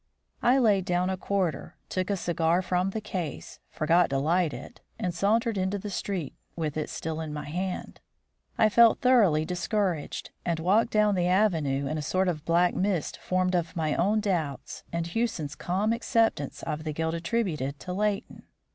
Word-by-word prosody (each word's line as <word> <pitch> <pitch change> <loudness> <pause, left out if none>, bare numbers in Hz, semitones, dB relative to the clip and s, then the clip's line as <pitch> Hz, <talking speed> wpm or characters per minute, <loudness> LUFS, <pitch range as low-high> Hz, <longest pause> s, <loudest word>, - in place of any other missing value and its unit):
I 250 +2 +4
laid 210 -7 +3
down 180 0 +1
a - - 0
quarter, 185 -5 -2
took 185 0 -2
a 200 - +1
cigar 175 0 +1
from 180 +1 0
the 215 +3 -4
case, 180 -8 -5
forgot 165 +2 +2
to 135 - 0
light 165 +3 +2
it, 125 0 -10 0.2
and 180 - -2
sauntered 215 +3 +1
into 190 +2 0
the 205 +1 -6
street 185 -7 -3 0.2
with 155 -3 -3
it 155 - -2
still 160 0 -4
in 155 -1 -5
my 150 -1 -5
hand. 180 +4 -4 0.6
I 220 - +5
felt 230 +1 +5
thoroughly 205 -12 +4
discouraged, 180 -2 -2
and 170 -2 -1
walked 200 +8 +3
down 210 -1 +3
the 180 -2 +1
avenue 165 -8 +2
in 155 +3 -2
a - - -2
sort 185 +6 0
of 155 -4 -4
black 175 +1 +3
mist 185 -5 -1
formed 185 0 0
of 175 0 -1
my 155 -3 0
own 210 +5 +2
doubts 165 -9 -3
and 170 0 -2
Hewson's 170 -5 -2
calm 195 +8 0
acceptance 225 - 0
of 150 +1 -3
the 155 -1 -3
guilt 160 +1 -1
attributed 165 - -2
to 180 - -5
Leighton. 205 +1 -2
180 Hz, 180 wpm, -27 LUFS, 160-200 Hz, 0.6 s, I